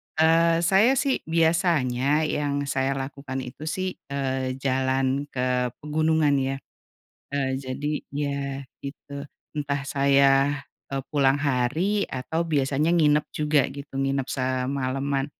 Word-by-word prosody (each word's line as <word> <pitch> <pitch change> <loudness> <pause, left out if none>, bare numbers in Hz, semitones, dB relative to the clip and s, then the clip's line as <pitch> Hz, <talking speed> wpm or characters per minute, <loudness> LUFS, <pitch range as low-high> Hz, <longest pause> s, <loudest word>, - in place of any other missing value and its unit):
eee, 165 +1 +4
saya 195 +9 +5
sih 270 0 +1
biasanya 160 -4 +2
yang 145 -2 -1
saya 135 -1 0
lakukan 135 -1 -5
itu 140 +5 -8
sih, 185 +3 -3
eee, 130 -2 -2
jalan 130 +1 0
ke 125 -2 0 0.2
pegunungan 155 -1 +2
ya. 135 0 -1 0.8
Eee, 135 -2 0
jadi 135 +3 -3 0.2
ya, 140 0 -2 0.4
gitu, 140 0 -7 0.3
entah 140 -1 -2
saya, 140 0 +3 0.3
e - - -5 0.2
pulang 140 -2 +3
hari, 155 +10 +1
atau 160 +6 -3
biasanya 145 +1 +1
nginep 150 -3 +3
juga 150 -3 +2
gitu, 140 -1 -8
nginep 135 -1 0
semalaman, 135 +1 -1
140 Hz, 115 wpm, -25 LUFS, 135-155 Hz, 0.8 s, saya